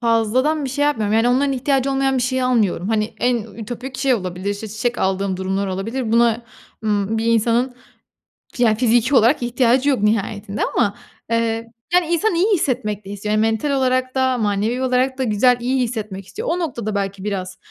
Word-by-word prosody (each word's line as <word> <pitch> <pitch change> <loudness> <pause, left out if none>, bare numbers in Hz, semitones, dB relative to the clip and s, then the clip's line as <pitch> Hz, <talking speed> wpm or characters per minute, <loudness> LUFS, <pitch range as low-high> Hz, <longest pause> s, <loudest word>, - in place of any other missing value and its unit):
fazladan 245 +6 +1
bir 265 - -3
şey 285 +2 0
yapmıyorum. 220 -7 +1
Yani, 230 +2 +3
onların 275 +2 +2
ihtiyacı 270 +1 0
olmayan 270 0 +1
bir 250 - +1
şeyi 260 0 0
almıyorum. 215 -7 +1
Hani, 220 -1 -1
en 245 0 +2 0.2
ütopik 245 +4 -7
şey 270 -2 +3
olabilir, 185 -1 -3
işte, 205 +2 -5
çiçek 230 +4 -2
aldığım 190 0 0
durumlar 190 +1 -2
olabilir. 220 +5 -3
Buna, 235 0 +3 0.4
ımm, 210 +1 0
bir 225 - -1
insanın 230 +2 +2 0.8
ya 235 -3 +3
fiziki 240 +3 +2
olarak 245 +3 +4
ihtiyacı 250 +3 +2
yok 265 - +2
nihayetinde 210 -1 -1
ama, 205 -4 +2 0.3
eee, 230 0 -1 0.2
hani, 360 -1 +4
insan 345 +4 +1
iyi 390 +6 +3
hissetmek 235 - -1
de - - -9
istiyor. 205 +1 -4
Yani, 215 - +2
mental 225 +5 0
olarak 255 -1 0
da 260 -1 +2
manevi 215 +3 0
olarak 260 +1 +1
da 265 - -1
güzel, 245 +2 +3
iyi 255 +1 0
hissetmek 215 -5 -5
istiyor. 450 +4 -6
O 355 - -1
noktada 235 - -3
belki 195 -1 -3
biraz, 185 -2 -4
235 Hz, 185 wpm, -20 LUFS, 210-260 Hz, 0.8 s, olarak